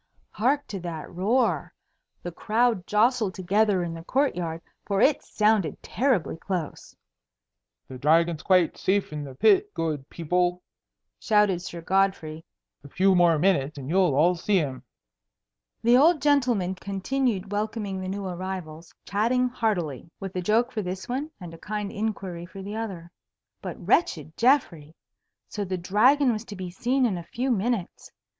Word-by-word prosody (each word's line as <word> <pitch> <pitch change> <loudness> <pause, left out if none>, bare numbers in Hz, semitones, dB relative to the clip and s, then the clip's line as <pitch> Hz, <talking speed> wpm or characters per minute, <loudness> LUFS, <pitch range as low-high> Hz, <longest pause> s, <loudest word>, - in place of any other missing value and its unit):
Hark 275 +6 +1
to 195 - -4
that 170 -3 -6
roar! 195 - 0 0.5
The 175 - -4
crowd 220 0 0
jostled 215 -2 +2
together 195 0 +1
in 170 -1 -4
the 165 0 -8
court 275 +9 +1
yard, 165 -2 -4 0.2
for 200 -1 -1
it 280 +6 +4
sounded 210 -8 +1
terribly 240 - 0
close. 175 -2 -5 0.9
"The 130 -1 -9
Dragon's 165 +3 +3
quite 185 -4 +2
safe 195 -4 0
in 150 -1 -4
the 135 -2 -9
pit, 405 - +4
good 150 -4 -3
people," 180 +2 -1 0.6
shouted 210 -5 +2
Sir 170 -1 -7
Godfrey. 175 -4 0 0.4
"A 140 - -12
few 190 +6 +3
more 175 -3 +4
minutes 155 -4 +1
and 135 +2 -6
you'll 180 -6 +3
all 165 +5 +4
see 190 +3 +1
him." 135 -7 -2 1.0
The 240 +2 +6
old 315 +4 +5
gentleman 250 -10 +2
continued 200 +2 -2
welcoming 205 -2 -3
the 185 - -5
new 200 +1 -4
arrivals, 180 -3 -6
chatting 245 +5 +1
heartily, 175 - -2
with 195 -1 -7
a 180 - -1
joke 225 +7 +2
for 220 - -2
this 185 +1 -5
one 265 +5 -3
and 175 -3 -9
a 165 - -12
kind 210 0 -4
inquiry 195 -5 -4
for 195 +1 -10
the 205 +2 -6
other. 190 -7 -6 0.5
But - - -6
wretched 160 - +1
Geoffrey! 175 - +1 0.5
So 205 - -4
the 185 -1 -3
Dragon 245 +10 +3
was 215 0 -4
to 205 - -8
be 185 -2 -6
seen 255 +7 +1
in 195 -7 0
a - - -8
few 255 +3 -1
minutes! 220 -3 -2
190 Hz, 160 wpm, -26 LUFS, 170-225 Hz, 1.0 s, The